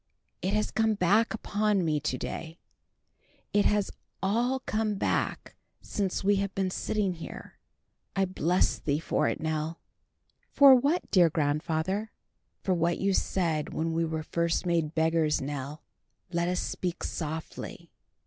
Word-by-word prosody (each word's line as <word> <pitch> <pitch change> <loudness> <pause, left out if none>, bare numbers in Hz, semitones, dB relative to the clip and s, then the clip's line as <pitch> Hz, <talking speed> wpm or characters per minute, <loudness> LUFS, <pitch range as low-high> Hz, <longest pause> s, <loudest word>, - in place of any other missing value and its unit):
"It 195 +3 0
has 215 - 0
come 220 -1 +2
back 205 +4 +3
upon 210 -3 0
me 155 -2 +1
to 140 -3 -2
day; 160 +5 -6 1.0
it 205 -1 +4
has 210 -1 +2 0.3
all 240 +7 +1
come 215 -3 -1
back 195 - -1 0.2
since 195 -2 -2
we 200 +1 +4
have 200 0 -2
been 190 -1 0
sitting 200 0 -1
here. 165 - -9 0.6
I 195 0 +3
bless 180 -1 +1
thee 145 -2 0
for 165 - 0
it, - - -1
Nell." 160 +1 -2 0.7
"For 280 -1 +8
what, 280 +7 +2
dear 175 -4 +6
grandfather?" 160 +7 -1 0.5
"For 190 - +2
what 170 0 +1
you 195 0 +1
said 165 -6 0
when 165 +1 -1
we 165 +1 +1
were 160 -1 -2
first 170 +2 0
made 165 -3 0
beggars, 160 -1 +2
Nell. 145 +2 -5 0.5
Let 170 -1 0
us 180 0 0
speak 180 -1 -3
softly. 160 0 -5
175 Hz, 145 wpm, -29 LUFS, 160-205 Hz, 1.0 s, For